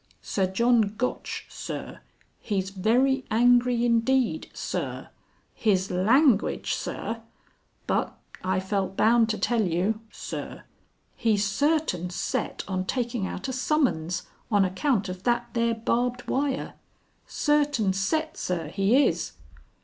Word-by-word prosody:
"Sir 190 Hz, -2 st, 0 dB
John 220 Hz, +1 st, +2 dB
Gotch, 250 Hz, +1 st, -3 dB
Sir. -, -, -7 dB, 0.4 s
He's 195 Hz, -2 st, -2 dB
very 250 Hz, +8 st, +2 dB
angry 245 Hz, +1 st, +4 dB
indeed, 245 Hz, +4 st, +1 dB
Sir. -, -, -4 dB, 0.4 s
His 195 Hz, -4 st, +1 dB
language, 225 Hz, -, +3 dB
Sir. 230 Hz, 0 st, -4 dB, 0.6 s
But -, -, -1 dB, 0.3 s
I 185 Hz, 0 st, +1 dB
felt 190 Hz, 0 st, -2 dB
bound 230 Hz, 0 st, +4 dB
to 215 Hz, -, 0 dB
tell 235 Hz, -2 st, +1 dB
you, 190 Hz, +3 st, 0 dB
Sir. -, -, -7 dB, 0.5 s
He's 210 Hz, -3 st, +2 dB
certain 250 Hz, -, +1 dB
set 175 Hz, -, -2 dB
on 185 Hz, -1 st, -2 dB
taking 240 Hz, -2 st, -1 dB
out 185 Hz, -, -5 dB
a 260 Hz, -, -3 dB
summons 245 Hz, -, 0 dB, 0.3 s
on 205 Hz, -3 st, +4 dB
account 200 Hz, +3 st, 0 dB
of 185 Hz, 0 st, -6 dB
that 240 Hz, +2 st, 0 dB
there 235 Hz, -1 st, +1 dB
barbed 245 Hz, +2 st, -1 dB
wire. 275 Hz, 0 st, -1 dB, 0.5 s
Certain 290 Hz, -9 st, +1 dB
set, 310 Hz, +12 st, -1 dB
Sir, 170 Hz, -4 st, -2 dB
he 200 Hz, -, +3 dB
is." -, -, -1 dB
225 Hz, 120 wpm, -26 LUFS, 190-250 Hz, 0.6 s, angry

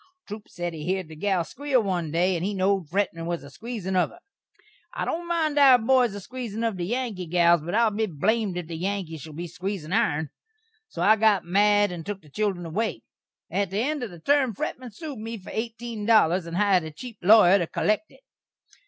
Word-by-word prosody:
Troup 210 Hz, 0 st, -8 dB
sed 175 Hz, -1 st, -4 dB
he 155 Hz, -2 st, -7 dB
heerd 185 Hz, 0 st, -2 dB
the 160 Hz, -, -10 dB
gal 190 Hz, +1 st, 0 dB
squeel 265 Hz, -, 0 dB
one 180 Hz, -5 st, -1 dB
day, 175 Hz, +4 st, +1 dB
and 170 Hz, -, -3 dB
he 200 Hz, +2 st, -1 dB
knowed 190 Hz, -3 st, +1 dB
Fretman 170 Hz, -3 st, -1 dB
was 170 Hz, -3 st, -3 dB
a 140 Hz, -, -12 dB
squeezin' 215 Hz, -, -5 dB
of 180 Hz, -, +3 dB
her. -, -, -16 dB, 0.8 s
I -, -, -2 dB
don't 345 Hz, +1 st, -3 dB
mind 315 Hz, -4 st, +1 dB
our 270 Hz, -3 st, +8 dB
boys 245 Hz, -2 st, +2 dB
a -, -, -5 dB
squeezin' 230 Hz, 0 st, -6 dB
of 225 Hz, -3 st, 0 dB
the 175 Hz, -1 st, -3 dB
Yankee 225 Hz, -6 st, -3 dB
gals, 170 Hz, -1 st, +4 dB
but 175 Hz, +5 st, -4 dB
I'll 230 Hz, -1 st, +4 dB
be 215 Hz, +1 st, -1 dB
blamed 195 Hz, +4 st, 0 dB
if 175 Hz, -, -4 dB
the 165 Hz, +1 st, -7 dB
Yankees 180 Hz, -4 st, -3 dB
shall 155 Hz, +1 st, -10 dB
be 170 Hz, +4 st, -5 dB
a -, -, -6 dB
squeezin' 180 Hz, -1 st, -5 dB
ourn. 155 Hz, -7 st, +1 dB, 0.6 s
So 170 Hz, -, -4 dB
I 215 Hz, +3 st, +6 dB
got 210 Hz, -4 st, +3 dB
mad 205 Hz, +2 st, +3 dB
and 170 Hz, -2 st, -6 dB
took 195 Hz, +1 st, -6 dB
the 150 Hz, -, -17 dB
children 195 Hz, -1 st, -1 dB
away. 210 Hz, +8 st, -2 dB, 0.5 s
At 200 Hz, -2 st, 0 dB
the 195 Hz, -, -4 dB
end 295 Hz, +1 st, -1 dB
of 240 Hz, -, -4 dB
the 175 Hz, -, -11 dB
term 270 Hz, -, +2 dB
Fretman 250 Hz, +4 st, -5 dB
sued 285 Hz, +2 st, -8 dB
me 225 Hz, +1 st, -5 dB
for 185 Hz, -, -11 dB
eighteen 230 Hz, -1 st, -4 dB
dollars, 185 Hz, -6 st, +4 dB
and 170 Hz, +1 st, -4 dB
hired 200 Hz, -3 st, +4 dB
a -, -, -5 dB
cheep 225 Hz, +7 st, -10 dB
lawyer 200 Hz, 0 st, +7 dB
to 170 Hz, -, -1 dB
kollekt 215 Hz, -, 0 dB
it. -, -, -21 dB
200 Hz, 225 wpm, -25 LUFS, 175-225 Hz, 0.8 s, our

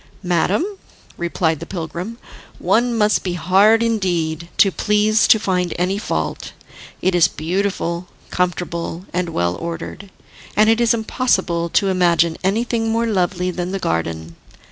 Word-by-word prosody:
"Madam," 180 Hz, -, +1 dB, 0.5 s
replied 170 Hz, -2 st, -1 dB
the 170 Hz, -, -7 dB
pilgrim, 180 Hz, +5 st, -5 dB, 0.4 s
"one 240 Hz, 0 st, +1 dB
must 210 Hz, -1 st, +3 dB
be 180 Hz, -, -3 dB
hard 195 Hz, +6 st, +4 dB
indeed 175 Hz, -7 st, -1 dB
to 195 Hz, -, +5 dB
please 210 Hz, +2 st, +2 dB
to 225 Hz, -, +7 dB
find 180 Hz, -4 st, -1 dB
any 185 Hz, +3 st, 0 dB
fault. 220 Hz, -, -3 dB, 0.5 s
It 185 Hz, -, +2 dB
is 170 Hz, -2 st, +5 dB
beautiful, 175 Hz, 0 st, -2 dB, 0.2 s
comfortable 175 Hz, -1 st, -2 dB
and 180 Hz, 0 st, -1 dB
well 85 Hz, -, 0 dB
ordered, 170 Hz, +4 st, -6 dB, 0.5 s
and 215 Hz, +1 st, +6 dB
it 225 Hz, +1 st, +2 dB
is 235 Hz, 0 st, +4 dB
impossible 190 Hz, -7 st, 0 dB
to 195 Hz, +3 st, +2 dB
imagine 170 Hz, -3 st, +2 dB
anything 225 Hz, +3 st, 0 dB
more 230 Hz, +1 st, +1 dB
lovely 185 Hz, -3 st, 0 dB
than 180 Hz, +1 st, -4 dB
the -, -, 0 dB
garden. 80 Hz, -, -3 dB
180 Hz, 140 wpm, -20 LUFS, 170-210 Hz, 0.5 s, to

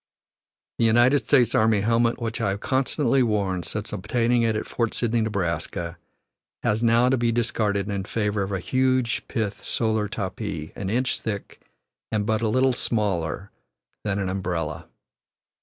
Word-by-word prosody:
The 115 Hz, -, +4 dB
United 120 Hz, +5 st, +5 dB
States 125 Hz, -4 st, +3 dB
army 110 Hz, -2 st, +3 dB
helmet 115 Hz, +2 st, +2 dB
which 115 Hz, -1 st, -3 dB
I -, -, +1 dB
have 100 Hz, +1 st, -2 dB
constantly 135 Hz, +1 st, +1 dB
worn 100 Hz, -6 st, +1 dB
since 100 Hz, +6 st, -4 dB
obtaining 120 Hz, +4 st, +1 dB
it 115 Hz, -1 st, +2 dB
at 105 Hz, -, -2 dB
Fort 115 Hz, -2 st, -2 dB
Sydney, 120 Hz, -1 st, +1 dB
Neb., 110 Hz, -2 st, -1 dB, 1.3 s
has 105 Hz, +1 st, +1 dB
now 120 Hz, +1 st, +4 dB
to 130 Hz, -, +3 dB
be 120 Hz, -1 st, +1 dB
discarded 110 Hz, -4 st, 0 dB
in 100 Hz, -2 st, -3 dB
favor 105 Hz, -1 st, -1 dB
of 95 Hz, +1 st, -2 dB
a 95 Hz, -, -1 dB
huge 130 Hz, +4 st, +1 dB
pith 105 Hz, -3 st, -3 dB
solar 110 Hz, -2 st, 0 dB
topee 95 Hz, -5 st, -4 dB
an 95 Hz, -1 st, -4 dB
inch 125 Hz, +4 st, 0 dB
thick 100 Hz, -3 st, -5 dB, 0.5 s
and 105 Hz, -2 st, 0 dB
but 110 Hz, 0 st, +1 dB
little 130 Hz, +4 st, +3 dB
smaller 100 Hz, -5 st, -1 dB, 0.5 s
than 100 Hz, -2 st, -1 dB
an 95 Hz, -2 st, -1 dB
umbrella. 85 Hz, -4 st, -3 dB
110 Hz, 155 wpm, -25 LUFS, 100-120 Hz, 1.3 s, United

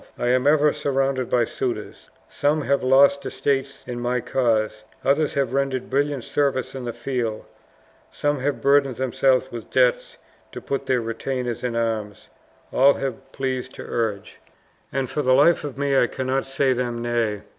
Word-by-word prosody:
I 120 Hz, -, 0 dB
am 130 Hz, +2 st, +2 dB
ever 150 Hz, 0 st, +4 dB
surrounded 135 Hz, -2 st, -1 dB
by 120 Hz, -1 st, +3 dB
suitors. 115 Hz, -3 st, -5 dB, 0.2 s
Some 150 Hz, +2 st, 0 dB
have 140 Hz, +2 st, +1 dB
lost 140 Hz, +2 st, +5 dB
estates 135 Hz, 0 st, -2 dB
in 120 Hz, -1 st, -5 dB
my 125 Hz, +1 st, 0 dB
cause, 110 Hz, -3 st, 0 dB, 0.2 s
others 145 Hz, +2 st, +2 dB
have 135 Hz, -3 st, 0 dB
rendered 135 Hz, -2 st, -1 dB
brilliant 140 Hz, -1 st, 0 dB
services 140 Hz, -1 st, -1 dB
in 130 Hz, -2 st, -6 dB
the 120 Hz, -, -2 dB
field, 115 Hz, -3 st, -3 dB, 0.7 s
some 145 Hz, -1 st, -1 dB
have 140 Hz, +2 st, -2 dB
burdened 140 Hz, -2 st, +3 dB
themselves 130 Hz, +1 st, +1 dB
with 115 Hz, -2 st, -8 dB
debts -, -, +1 dB, 0.4 s
to -, -, -5 dB
put 140 Hz, 0 st, -4 dB
their 130 Hz, -2 st, +2 dB
retainers 120 Hz, +1 st, -3 dB
in 120 Hz, -2 st, -2 dB
arms 110 Hz, -3 st, -3 dB, 0.4 s
all 140 Hz, +2 st, +5 dB
have 135 Hz, 0 st, -5 dB
pleased 130 Hz, -1 st, -3 dB
to -, -, -8 dB
urge, 110 Hz, -4 st, -3 dB, 0.5 s
and 135 Hz, -1 st, -1 dB
for 150 Hz, -, -2 dB
the 130 Hz, -2 st, +3 dB
life 160 Hz, +5 st, +4 dB
of 145 Hz, -3 st, -6 dB
me 140 Hz, 0 st, 0 dB
I 125 Hz, -, +4 dB
cannot 130 Hz, +2 st, -2 dB
say 135 Hz, 0 st, +1 dB
them 120 Hz, -1 st, -3 dB
nay. 115 Hz, -4 st, -1 dB
130 Hz, 165 wpm, -23 LUFS, 120-140 Hz, 0.7 s, lost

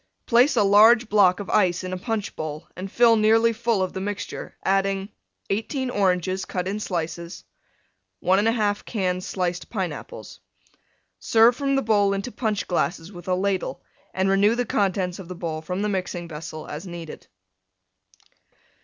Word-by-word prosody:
Place 250 Hz, +4 st, +4 dB
a 220 Hz, -, +4 dB
large 220 Hz, +4 st, +6 dB
block 195 Hz, -3 st, +4 dB
of 200 Hz, -, -6 dB
Ice 185 Hz, -3 st, +2 dB
in 185 Hz, 0 st, -4 dB
a -, -, -2 dB
Punch 220 Hz, -1 st, -3 dB
bowl 155 Hz, +1 st, -6 dB
and 190 Hz, +2 st, -7 dB
fill 235 Hz, -1 st, +5 dB
nearly 225 Hz, +1 st, +4 dB
full 225 Hz, -3 st, 0 dB
of 185 Hz, -, -4 dB
the 190 Hz, -, -4 dB
mixture, 205 Hz, +1 st, -5 dB
adding: 195 Hz, 0 st, +1 dB, 0.4 s
18 250 Hz, +5 st, -2 dB
Oranges, 185 Hz, -2 st, 0 dB
cut 185 Hz, -1 st, -3 dB
in 200 Hz, +2 st, -2 dB
slices. 170 Hz, -3 st, -4 dB, 0.8 s
1 190 Hz, +3 st, +3 dB
1/2 215 Hz, -2 st, +1 dB
cans 185 Hz, -4 st, -2 dB
sliced 180 Hz, -2 st, -3 dB
Pineapples. 145 Hz, -, -6 dB, 0.8 s
Serve 225 Hz, -, +4 dB
from 275 Hz, +1 st, 0 dB
the 270 Hz, -, +1 dB
bowl 205 Hz, -2 st, +3 dB
into 200 Hz, +5 st, -4 dB
Punch 215 Hz, -4 st, -2 dB
glasses 175 Hz, 0 st, -1 dB
with 175 Hz, -2 st, -11 dB
a 185 Hz, -, +2 dB
Ladle, 190 Hz, 0 st, -2 dB, 0.3 s
and 190 Hz, +1 st, 0 dB
renew 200 Hz, +3 st, +3 dB
the 245 Hz, 0 st, -1 dB
contents 190 Hz, -4 st, 0 dB
of 185 Hz, -, -9 dB
the 180 Hz, -, -7 dB
bowl 165 Hz, -3 st, -4 dB
from 180 Hz, +5 st, -3 dB
the -, -, +1 dB
mixing 180 Hz, -3 st, -3 dB
vessel 155 Hz, 0 st, -7 dB
as 155 Hz, +6 st, -7 dB
needed. 170 Hz, -2 st, -9 dB
195 Hz, 160 wpm, -24 LUFS, 180-215 Hz, 0.8 s, large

